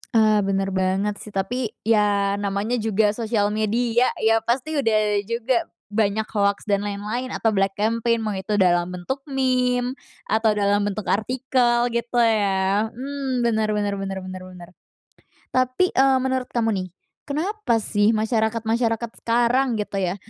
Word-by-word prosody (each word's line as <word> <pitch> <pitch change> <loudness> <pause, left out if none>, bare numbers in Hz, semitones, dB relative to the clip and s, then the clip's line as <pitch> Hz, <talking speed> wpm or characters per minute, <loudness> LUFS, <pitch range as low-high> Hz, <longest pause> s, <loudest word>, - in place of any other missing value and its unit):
Ah 215 -1 +5
bener 195 -1 0
banget 190 +2 0
sih, 210 - -10
tapi 230 +5 -1 0.2
ya 205 -2 +2
namanya 205 +4 -1
juga 215 -1 +2
sosial 215 -2 0
media 230 +3 +1 0.2
ya, 225 0 +4
pasti 265 +7 -1
udah 225 -5 +2 0.3
juga 235 +1 0 0.2
banyak 215 0 +1
hoaks, 200 -1 +1
dan 200 -1 +2
lain-lain, 210 +5 -4
atau 225 - 0
black 195 0 +1
campaign 230 +2 +1
mau 215 - -1
itu 195 +2 -2
dalam 175 -1 +3
bentuk 180 +10 -4
meme, 255 -1 0 0.3
atau 220 0 +2
dalam 205 0 +2
bentuk 205 +1 -3
artikel 240 +2 +1
gitu 235 +1 -1
ya. 205 -2 +2
Hmm, 265 0 -3
bener 220 -2 +1
bener 205 -1 -1
bener 195 -1 -4
bener 185 0 -7
bener. 180 -2 -12 0.9
Tapi, 255 +8 +2
eee, 265 0 +4
menurut 260 -1 -1
kamu 225 -2 +1
nih, - - -7 0.4
kenapa 315 - -1
sih 205 0 +2
masyarakat-masyarakat 225 +1 0
sekarang 240 +2 +2
gitu 200 -1 -3
ya, 180 +1 -1
220 Hz, 145 wpm, -23 LUFS, 205-245 Hz, 0.9 s, Ah